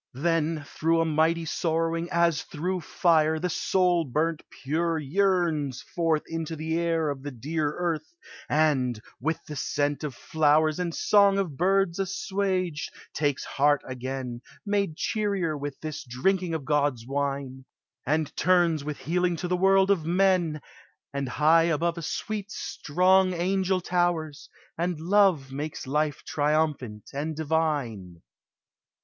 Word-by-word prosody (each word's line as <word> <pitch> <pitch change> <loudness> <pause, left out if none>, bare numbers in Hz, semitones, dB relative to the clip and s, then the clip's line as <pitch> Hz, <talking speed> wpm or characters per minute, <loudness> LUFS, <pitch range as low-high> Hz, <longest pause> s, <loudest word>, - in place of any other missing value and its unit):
Then 165 0 0
through 165 +3 0
a - - +1
mighty 160 +1 +1
sorrowing, 165 +1 -1
as 170 -2 +2
through 180 +2 -3
fire, 160 -2 +2
The 180 +2 -2
soul 180 0 +2
burnt 155 +4 -1 0.2
pure 165 +4 0
yearns 160 -4 0
forth 165 -3 0
into 165 0 -4
the 160 +1 -2
air 165 -3 +1
Of 135 -2 -6
the 145 - -5
dear 150 +4 -2
earth 170 - -2 0.4
and, 135 -7 +2 0.2
with 160 +5 -2
the 150 - -7
scent 145 +1 -1
of 145 -5 -4
flowers 155 +2 +2
And 175 -2 -2
song 200 -1 +4
of 180 -8 -1
birds 190 +2 +2
assuaged, 190 -3 -1 0.2
takes 145 -2 -1
heart 145 +1 +2
again, 130 -1 -5 0.2
Made 200 -6 0
cheerier 200 -7 -1
with 145 -1 -6
this 155 -1 -5
drinking 165 +8 0
of 150 -4 -5
God's 145 -5 +1
wine, 135 -1 -3 0.4
And 155 +2 -1
turns 175 -4 +3
with 150 0 -4
healing 175 +4 0
to 180 - -4
the 180 - +1
world 195 +1 +4
of 185 -5 +2
men, 175 -3 +2 0.5
And 140 -2 -2
high 160 +5 +4
above 170 +1 0
a - - -6
sweet 205 +5 -4
strong 185 +1 +2
angel 185 +1 0
towers, 175 -4 -1 0.3
And 175 -2 -1
Love 175 -6 +3
makes 145 +3 -5
life 150 +2 -1
triumphant 145 -8 -1
and 150 +3 -3
divine. 145 - -2
160 Hz, 140 wpm, -27 LUFS, 145-175 Hz, 0.5 s, song